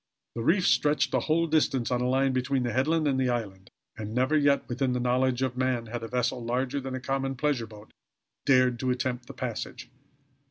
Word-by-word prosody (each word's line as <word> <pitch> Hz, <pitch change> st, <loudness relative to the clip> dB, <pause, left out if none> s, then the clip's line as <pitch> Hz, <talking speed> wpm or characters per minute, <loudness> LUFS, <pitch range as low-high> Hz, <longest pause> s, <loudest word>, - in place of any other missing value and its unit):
The 115 Hz, -, -4 dB
reef 175 Hz, -, +2 dB
stretched 140 Hz, +5 st, +2 dB
the -, -, +2 dB
whole 165 Hz, +2 st, +3 dB
distance, 145 Hz, -7 st, +1 dB
on 125 Hz, 0 st, +1 dB
a 125 Hz, -, +1 dB
line 135 Hz, +1 st, +2 dB
between 130 Hz, +1 st, 0 dB
the 120 Hz, -2 st, -2 dB
headland 155 Hz, +5 st, +1 dB
and 135 Hz, -2 st, +1 dB
the 130 Hz, -1 st, +1 dB
island; 100 Hz, -6 st, -4 dB, 0.3 s
and 110 Hz, 0 st, -6 dB
never 130 Hz, +5 st, +2 dB
yet 145 Hz, -2 st, +3 dB
within 125 Hz, +1 st, -1 dB
the 125 Hz, -, -1 dB
knowledge 125 Hz, +1 st, +1 dB
of 130 Hz, -1 st, -1 dB
man 130 Hz, -2 st, 0 dB
had 120 Hz, +1 st, -5 dB
a 115 Hz, -, -5 dB
vessel 125 Hz, 0 st, -1 dB
larger 125 Hz, +4 st, -1 dB
than 135 Hz, -1 st, -5 dB
a -, -, -3 dB
common 135 Hz, 0 st, -2 dB
pleasure 130 Hz, -4 st, -1 dB
boat 105 Hz, -1 st, -14 dB, 0.5 s
dared 130 Hz, -3 st, +3 dB
to 130 Hz, -, -1 dB
attempt 125 Hz, -1 st, -2 dB
the -, -, -9 dB
passage. -, -, -5 dB
130 Hz, 210 wpm, -27 LUFS, 120-135 Hz, 0.5 s, whole